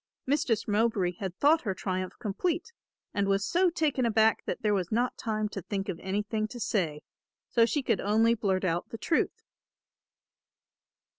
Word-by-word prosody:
Mistress 260 -5 +1
Mowbray 210 -4 +2
had 190 -2 -4
thought 310 +3 +4
her 195 -5 -2
triumph 185 -1 -3
complete 345 - -2 0.4
and 200 -1 0
was 195 +1 +1
so 360 +1 +3
taken 305 -6 0
aback 220 -1 +3
that - - -4
there 210 -1 +3
was 185 -3 -1
not 240 +3 +1
time 215 -2 -2
to 195 - -5
think 195 +3 -4
of 170 -3 -3
anything 210 +3 -2
to 240 +2 -9
say, 165 -10 -1 0.5
so 230 -1 +5
she 290 +3 0
could 230 -5 +1
only 220 +3 +3
blurt 200 -5 0
out 175 -1 -1
the 225 - -6
truth. 320 - 0
215 Hz, 165 wpm, -29 LUFS, 195-240 Hz, 0.5 s, so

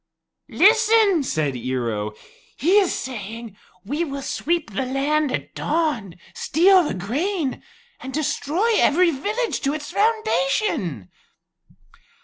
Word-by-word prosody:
"Listen," 435 -2 +4
said 155 - -1
Ear 125 -1 -2
o; 105 0 -4 0.4
"he 365 +8 +4
is 385 -3 +1
saying, 230 -3 -6 0.3
'We 295 +10 -1
will 275 -2 -6
sweep 330 -5 -2
the 205 +7 -2
land 280 +3 0
at - - -4
dawn, 295 - -1 0.2
steal 370 +5 +4
the 300 - -3
grain, 280 - -2 0.4
and 265 - -7
destroy 310 - 0
every 345 +3 +4
village 425 - -2
to 280 +2 0
its 295 -1 -7
foundation.'" 275 - 0
290 Hz, 120 wpm, -22 LUFS, 225-365 Hz, 0.4 s, Listen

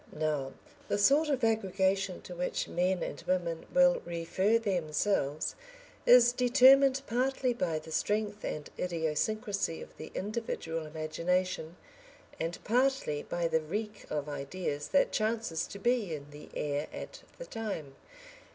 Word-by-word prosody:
Now 150 -3 -2 0.3
the - - 0
sort 285 +9 +4
of 270 -4 0
aggregation 195 -3 +1
to 180 - -8
which 180 +1 -2
men 180 +1 0
and - - -5
women 175 -3 -1
will 270 0 +5
refer 175 +6 +1
themselves 170 -6 0 0.5
is 240 -1 +8
determined 265 +2 +6
partly 255 +1 +1
by 175 -8 -1
the 155 +1 -8
strength 210 +4 -1
and 150 -1 -4
idiosyncrasy 180 +3 -1
of - - -11
the 155 - -8
individual 185 -7 -3
imagination, 165 +2 -1 0.6
and 165 +1 -2
partly 250 - +1
by 175 -1 -1
the 160 -1 +1
reek 210 +6 -5
of 150 -1 -2
ideas 145 +1 -4
that 280 - +3
chances 215 -7 -1
to - - -8
be 220 -5 +1
in 145 0 -10
the 150 +1 -11
air 145 0 -1
at - - -8 0.2
the - - -7
time. 200 - -5
185 Hz, 135 wpm, -31 LUFS, 160-225 Hz, 0.6 s, is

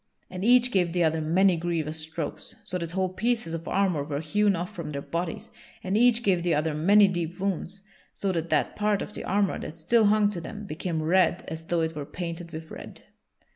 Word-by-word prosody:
And 185 0 -5
each 250 +2 +5
gave 175 -5 +1
the 175 -1 +2
other 160 0 +1
many 180 +4 +3
grievous 160 -2 -2
strokes, 160 0 -5
so 180 - -3
that 170 -1 -5
whole 185 0 -1
pieces 225 -4 -1
of 165 0 -5
armor 185 -7 +1
were 145 -1 -3
hewn 200 +6 +2
off 175 +1 -4
from 160 -3 -6
their 140 -1 -4
bodies; 170 0 -4 0.3
and 190 +2 -1
each 240 +1 +4
gave 185 -5 +2
the 170 -1 +1
other 155 +1 0
many 200 +7 +5
deep 175 -1 -3
wounds, 195 0 -3 0.3
so 195 - -2
that 165 -2 -2
that - - +1
part 210 -1 +1
of 210 - -9
the - - -6
armor 200 0 0
that 155 - -7
still 215 +8 +3
hung 210 0 +4
to 175 -4 -5
them 210 +5 -7
became 160 -1 -3
red 180 +1 +2
as 160 0 -6
though 170 0 0
it 160 0 -2
were 150 - -4
painted 170 -1 -6
with 160 0 -8
red. - - -10
175 Hz, 215 wpm, -26 LUFS, 160-200 Hz, 0.3 s, each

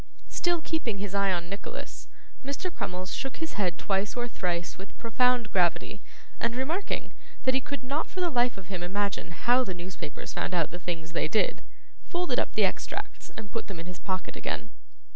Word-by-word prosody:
Still 345 -2 +2
keeping 305 -11 0
his 200 0 -3
eye 200 -1 +4
on 175 -1 0
Nicholas, 205 - -5 0.4
Mr. 280 +7 -2
Crummles 185 -3 -2
shook 270 - -2
his 325 0 -2
head 180 -4 +1
twice 200 +3 +1
or 240 0 +1
thrice 175 -6 -1
with 195 +2 -10
profound 245 -1 +3
gravity, 175 -3 +3 0.4
and 235 - +2
remarking, 315 +10 0 0.3
that 260 - +5
he 265 - +4
could 280 +1 -4
not 280 +5 0
for 375 - -5
the 355 -2 +3
life 245 -3 +4
of 195 - -7
him 185 -1 -3
imagine 200 +1 0
how 245 +9 +4
the 185 -7 -3
newspapers 175 -4 -5
found 180 - 0
out 165 -3 +3
the 175 - -5
things 165 -2 -3
they 170 - +2
did, 215 +7 +3 0.5
folded 355 0 +2
up - - 0
the - - +6
extracts - - -2
and 220 -2 -6
put 230 - -2
them 195 -5 -5
in 165 - -5
his 180 0 -6
pocket 185 -2 -2
again. - - -2
205 Hz, 195 wpm, -30 LUFS, 180-260 Hz, 0.5 s, the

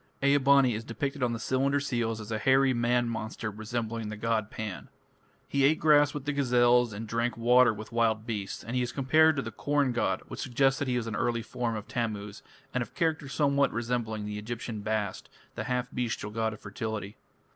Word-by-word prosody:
Ea 140 +1 +5
bani 140 -2 +5
is 110 +2 -4
depicted 135 +5 -4
on 125 -1 +2
the 115 - -2
cylinder 135 +4 +1
seals 120 -5 -1
as 105 +1 -8
a 110 - -1
hairy 135 +1 +4
man 120 0 +1
monster 110 -1 -4
resembling 110 +1 -4
the 105 - -6
god 110 -1 0
Pan. 105 -4 -6 0.6
He 140 -1 +1
ate 150 +3 +4
grass 145 -2 +5
with 145 -2 -6
the 145 - -1
gazelles 125 -3 +3
and 110 +2 -6
drank 115 +2 -1
water 120 +1 +5
with 110 0 -8
wild 115 -2 +1
beasts, 105 -4 -4
and 115 - -5
he 125 - +2
is 120 -1 -2
compared 155 +4 +4
to 135 - -1
the - - -5
corn 145 -2 +1
god, 95 -6 0
which - - -8
suggests 135 +1 +1
that 145 - -2
he 125 -1 +1
was 120 - -2
an 115 -2 -4
early 115 +1 0
form 115 0 -3
of 105 -1 -6
Tammuz, 105 -3 -3 0.3
and 125 - 0
of 120 - -6
character 160 -3 0
somewhat 140 0 +2
resembling 115 -2 -2
the 105 0 -4
Egyptian 115 0 -5
Bast, 110 -2 -2 0.2
the - - -5
half 125 -1 -1
bestial 115 -4 -3
god 110 0 -1
of 105 - -11
fertility. 105 0 -5
120 Hz, 210 wpm, -29 LUFS, 110-135 Hz, 0.6 s, Ea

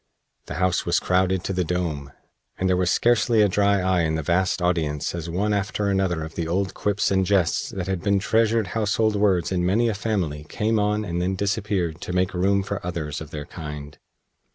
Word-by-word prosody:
The - - -5
house 90 +2 +1
was - - +2
crowded 95 0 +1
to 95 - -2
the 90 -1 0
dome, 80 -5 -3 0.5
and 95 - 0
there 95 - +3
was 90 -1 +1
scarcely 115 +1 +3
a - - +5
dry 100 0 +2
eye 90 -1 +2
in 80 -1 0
the 80 - -2
vast 90 +5 +1
audience 80 -5 0
as 85 -1 -5
one 100 +5 0
after 100 0 -1
another 95 -4 0
of 80 0 -7
the 85 -2 -3
old 95 +3 -1
Quips 105 -1 0
and 95 -1 +3
Jests 95 -3 +1
that 95 -2 -4
had 95 -2 -2
been 100 0 +2
treasured 110 +1 +1
household 110 0 +1
words 100 -4 +2
in 90 -2 0
many 110 +6 +2
a - - 0
family 95 -8 -2
came 110 +1 0
on 105 +1 0
and 85 -1 -2
then 95 +2 0
disappeared 100 -5 -1
to 90 - -5
make 90 +1 +1
room 95 +2 +2
for 100 0 -4
others 80 -5 -4
of 80 - -8
their 75 -2 -6
kind. 75 -3 -8
95 Hz, 210 wpm, -24 LUFS, 85-100 Hz, 0.5 s, a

